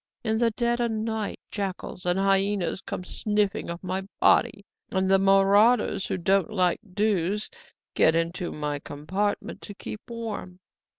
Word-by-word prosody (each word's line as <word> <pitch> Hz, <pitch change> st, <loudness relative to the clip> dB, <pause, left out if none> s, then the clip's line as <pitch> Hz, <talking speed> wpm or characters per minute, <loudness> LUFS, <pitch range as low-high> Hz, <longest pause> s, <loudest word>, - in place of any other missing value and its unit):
In 220 Hz, -1 st, 0 dB
the 235 Hz, -1 st, +4 dB
dead 235 Hz, +1 st, 0 dB
o' 240 Hz, -, +2 dB
night 220 Hz, -1 st, -3 dB
jackals 190 Hz, -3 st, -4 dB
and 175 Hz, +1 st, +2 dB
hyaenas 195 Hz, -1 st, +1 dB
come -, -, -5 dB
sniffing 210 Hz, +1 st, -1 dB
of 170 Hz, +2 st, -6 dB
my 185 Hz, +1 st, -2 dB, 0.2 s
body; 200 Hz, -, +3 dB, 0.3 s
and 190 Hz, 0 st, +1 dB
the 195 Hz, 0 st, +5 dB
marauders 195 Hz, +3 st, +4 dB
who -, -, -2 dB
don't 195 Hz, +4 st, +2 dB
like 185 Hz, -5 st, +1 dB, 0.2 s
dews 205 Hz, -1 st, 0 dB, 0.4 s
get 160 Hz, -, +4 dB
into 170 Hz, +2 st, -1 dB
my 150 Hz, -1 st, -3 dB
compartment 190 Hz, +10 st, -3 dB
to 205 Hz, -, -9 dB
keep 215 Hz, -, -7 dB
warm. 220 Hz, -6 st, -6 dB
195 Hz, 145 wpm, -26 LUFS, 180-215 Hz, 0.4 s, the